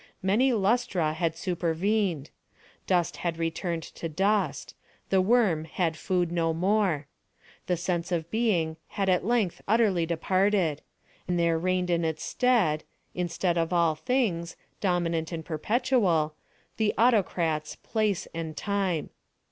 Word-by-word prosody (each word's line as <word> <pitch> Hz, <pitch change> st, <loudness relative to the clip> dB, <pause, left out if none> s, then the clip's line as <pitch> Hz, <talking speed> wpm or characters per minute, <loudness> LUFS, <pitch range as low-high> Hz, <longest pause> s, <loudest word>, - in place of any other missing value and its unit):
Many 220 Hz, +8 st, +3 dB
lustra 195 Hz, -7 st, +1 dB
had 160 Hz, 0 st, -1 dB
supervened. 175 Hz, -1 st, -1 dB, 0.6 s
Dust 175 Hz, -3 st, +1 dB
had 170 Hz, -2 st, -2 dB
returned 165 Hz, 0 st, -2 dB
to 165 Hz, -, -6 dB
dust. 195 Hz, +6 st, 0 dB, 0.4 s
The 190 Hz, -1 st, +4 dB
worm 190 Hz, -7 st, +3 dB
had 165 Hz, 0 st, -1 dB
food 175 Hz, 0 st, -1 dB
no 165 Hz, -2 st, 0 dB
more. 185 Hz, -4 st, +1 dB, 0.6 s
The 180 Hz, -, +1 dB
sense 175 Hz, +1 st, -2 dB
of 170 Hz, -1 st, -2 dB
being 180 Hz, -9 st, +1 dB
had 195 Hz, -2 st, -1 dB
at 180 Hz, -2 st, +2 dB
length 230 Hz, -7 st, +1 dB
utterly 200 Hz, -6 st, +3 dB
departed, 185 Hz, -1 st, +1 dB, 0.5 s
and 180 Hz, -1 st, 0 dB
there 170 Hz, -1 st, +2 dB
reigned 180 Hz, 0 st, 0 dB
in 170 Hz, 0 st, +1 dB
its 160 Hz, -1 st, -2 dB
stead—instead 175 Hz, -5 st, 0 dB
of 165 Hz, +1 st, 0 dB
all 170 Hz, -2 st, +3 dB
things—dominant 175 Hz, -5 st, -1 dB
and 160 Hz, -2 st, -5 dB
perpetual—the 200 Hz, -, 0 dB
autocrats 175 Hz, -9 st, +2 dB
Place 215 Hz, -4 st, -1 dB
and 165 Hz, -2 st, -5 dB
Time. 195 Hz, -5 st, -1 dB
175 Hz, 120 wpm, -27 LUFS, 165-200 Hz, 0.6 s, The